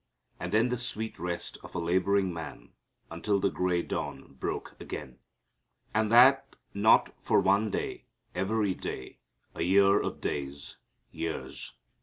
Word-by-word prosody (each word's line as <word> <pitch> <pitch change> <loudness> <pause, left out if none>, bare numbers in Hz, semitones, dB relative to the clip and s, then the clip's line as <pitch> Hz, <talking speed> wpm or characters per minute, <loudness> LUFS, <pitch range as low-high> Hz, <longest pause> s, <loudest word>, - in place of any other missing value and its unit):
And 90 - -4
then 110 +4 +3
the 125 -1 -1
sweet 110 -2 -4
rest 90 -1 -4
of - - -11
a - - 0
laboring 95 +2 +2
man 80 -1 -8 0.4
until 100 +5 0
the 95 0 +1
gray 90 -1 0
dawn - - -5
broke 65 - -4
again. 65 -1 -7 0.7
And 110 0 +1
that 130 +3 +6 0.2
not 105 +3 +4
for - - +3
one 100 +3 +3
day, - - -4 0.3
every 105 0 0
day, 65 - -7 0.3
a - - -6
year 100 +3 +5
of - - -4
days 70 0 -4 0.3
years. 80 -1 -5
95 Hz, 140 wpm, -29 LUFS, 85-110 Hz, 0.7 s, that